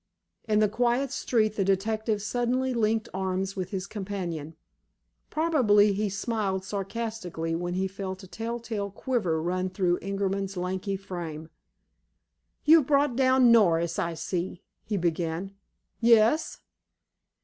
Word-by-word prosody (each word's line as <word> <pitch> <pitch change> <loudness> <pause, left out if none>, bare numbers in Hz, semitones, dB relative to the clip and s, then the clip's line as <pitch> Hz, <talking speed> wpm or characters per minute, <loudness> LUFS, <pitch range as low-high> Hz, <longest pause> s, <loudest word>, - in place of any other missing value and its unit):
In 215 -1 +2
the 215 0 +4
quiet 245 +5 +1
street 215 -5 0
the 195 - +2
detective 210 +2 0
suddenly 250 +3 0
linked 220 -1 +1
arms 190 0 -2
with 185 -2 -3
his 190 -3 -3
companion. 185 -7 -5 0.7
Probably 235 -11 +4
he 205 +1 -1
smiled 195 -2 -2
sardonically 195 -5 -4
when 175 +1 -3
he 190 +1 0
felt 190 0 -6
a - - -10
telltale 225 -1 -4
quiver 200 -6 -1
run 185 +3 -1
through 180 -2 0
Ingerman's 195 0 -2
lanky 185 +2 -2
frame. 170 -5 -6 1.1
"You've 310 -3 +6
brought 280 -3 +3
down 260 -1 +5
Norris, 170 -7 +4
I 170 0 -1
see?" 180 +1 -4 0.2
he 210 - -2
began. 170 +2 -2 0.5
"Yes." 230 +5 +4
200 Hz, 125 wpm, -27 LUFS, 185-230 Hz, 1.1 s, You've